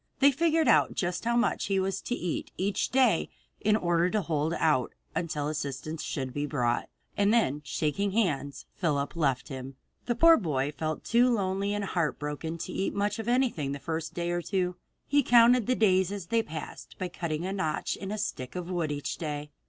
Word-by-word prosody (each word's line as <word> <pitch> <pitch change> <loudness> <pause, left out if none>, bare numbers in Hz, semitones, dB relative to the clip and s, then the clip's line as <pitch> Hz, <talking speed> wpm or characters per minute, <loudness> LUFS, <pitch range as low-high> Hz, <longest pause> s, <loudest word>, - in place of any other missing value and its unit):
They 280 +1 +6
figured 320 +1 +2
out 230 - +4
just 180 +3 -2
how 235 0 +2
much 240 - +1
he 195 -1 +1
was 190 0 -1
to 245 - -2
eat 175 -8 -3
each 195 +1 0
day 250 -9 +3 0.3
in 210 0 +3
order 175 -3 +2
to 210 0 0
hold 155 0 0
out 150 -8 +1 0.2
until 155 -4 -2
assistance 150 +1 -4
should 130 -3 -4
be 145 +2 -2
brought, 120 -5 0 0.3
and 200 +1 +3
then 150 - +2
shaking 155 +7 -1
hands, 150 -10 -1
Phillips 145 -5 -1
left 135 -6 0
him. 130 0 -7 0.3
The 240 - +1
poor 330 +6 +7
boy 145 -7 -1
felt 155 +1 -3
too 245 +2 +4
lonely 200 -2 0
and 205 -1 -2
heartbroken 160 -2 -2
to - - -6
eat 195 - -1
much 205 +1 0
of 225 - -5
anything 240 - +1
in - - -2
the 140 - -5
first 165 +2 -4
day 175 0 -1
or 175 0 0
two. 180 -1 -1 0.3
He 285 0 +3
counted 240 -2 +5
the 255 - +3
days 190 -4 +3
as 200 -3 -5
they 230 +6 +2
passed 155 -7 -8
by 185 - -2
cutting 170 -2 -3
a 190 - -2
notch 160 -6 -1
in 195 0 -6
a 215 - -2
stick 130 -11 -4
of 180 0 -4
wood 170 -4 -1
each 145 -1 -3
day. 150 -2 -4
175 Hz, 200 wpm, -28 LUFS, 150-210 Hz, 0.3 s, poor